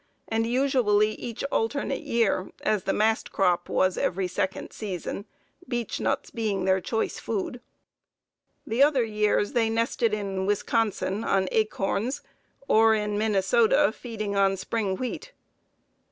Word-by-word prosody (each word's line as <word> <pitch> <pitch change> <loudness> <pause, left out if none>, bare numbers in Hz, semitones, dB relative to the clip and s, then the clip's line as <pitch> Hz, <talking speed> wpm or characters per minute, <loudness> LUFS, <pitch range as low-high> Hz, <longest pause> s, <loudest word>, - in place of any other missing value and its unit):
and 225 0 0
usually 235 -5 +2
each 230 +1 -6
alternate 270 +4 -1
year, 225 -5 0
as 210 -4 0
the - - +1
mast 220 +1 +1
crop 180 -3 +1
was 185 -1 +1
every 185 +1 0
second 185 +1 -3
season, 200 -1 -5 0.4
beech 240 -3 -3
nuts - - -1
being 205 -5 -1
their 190 0 +3
choice 220 +4 -2
food. 230 +3 -3 1.0
The 230 +4 0
other 280 -3 +5
years 210 -2 +1
they 225 -2 +2
nested 230 0 +1
in 195 -2 -2
Wisconsin 205 0 0
on 190 -3 +1
acorns, 215 +4 -1 0.4
or 220 0 +5
in 210 -1 -1
Minnesota, 220 +6 +3
feeding 215 -4 -5
on 195 -1 +3
spring 195 0 -2
wheat. 255 - -5
215 Hz, 130 wpm, -26 LUFS, 195-230 Hz, 1.0 s, other